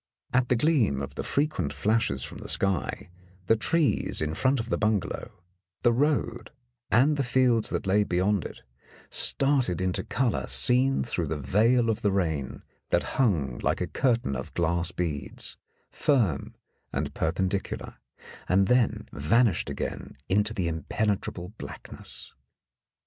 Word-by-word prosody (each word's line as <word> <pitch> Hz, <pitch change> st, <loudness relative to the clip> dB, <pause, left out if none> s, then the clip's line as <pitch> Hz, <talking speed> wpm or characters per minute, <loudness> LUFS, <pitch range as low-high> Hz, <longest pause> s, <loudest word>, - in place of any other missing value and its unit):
At 125 Hz, -1 st, +2 dB
the 125 Hz, -, +4 dB
gleam 120 Hz, -, +2 dB
of 70 Hz, -, -5 dB
the -, -, -4 dB
frequent 140 Hz, -, 0 dB
flashes 75 Hz, -, +1 dB
from -, -, -7 dB
the -, -, -8 dB
sky, 95 Hz, -2 st, -1 dB, 0.3 s
the 115 Hz, -, +4 dB
trees 150 Hz, +6 st, +1 dB
in 75 Hz, 0 st, 0 dB
front 130 Hz, +9 st, +2 dB
of 115 Hz, +1 st, -4 dB
the -, -, +1 dB
bungalow, 105 Hz, -4 st, -2 dB, 0.4 s
the 120 Hz, -, +5 dB
road, 120 Hz, -4 st, 0 dB, 0.4 s
and 140 Hz, +6 st, +4 dB
the 140 Hz, -, +1 dB
fields 125 Hz, -2 st, +3 dB
that -, -, -2 dB
lay 100 Hz, +2 st, +3 dB
beyond 95 Hz, 0 st, +1 dB
it, -, -, -9 dB, 0.5 s
started 135 Hz, -, +1 dB
into 95 Hz, -1 st, 0 dB
colour 125 Hz, -5 st, 0 dB
seen 125 Hz, -, +2 dB
through 85 Hz, -8 st, -2 dB
the 80 Hz, -, -2 dB
veil 115 Hz, -, +3 dB
of 110 Hz, -2 st, 0 dB
the 100 Hz, -, +2 dB
rain, 80 Hz, -8 st, -1 dB, 0.3 s
that -, -, 0 dB
hung 75 Hz, -, +1 dB
like -, -, 0 dB
a 90 Hz, -, 0 dB
curtain 115 Hz, -, 0 dB
of 65 Hz, -, -6 dB
glass 85 Hz, +1 st, 0 dB
beads, 80 Hz, -5 st, -4 dB, 0.4 s
firm 115 Hz, -, +1 dB, 0.4 s
and -, -, -2 dB
perpendicular, 95 Hz, +4 st, -2 dB, 0.5 s
and 95 Hz, +1 st, +3 dB
then 125 Hz, -2 st, +2 dB
vanished 95 Hz, -, +2 dB
again -, -, -5 dB
into 105 Hz, +3 st, +2 dB
the 95 Hz, -6 st, -1 dB
impenetrable 90 Hz, +2 st, -2 dB
blackness. -, -, -9 dB
105 Hz, 145 wpm, -27 LUFS, 85-120 Hz, 0.5 s, the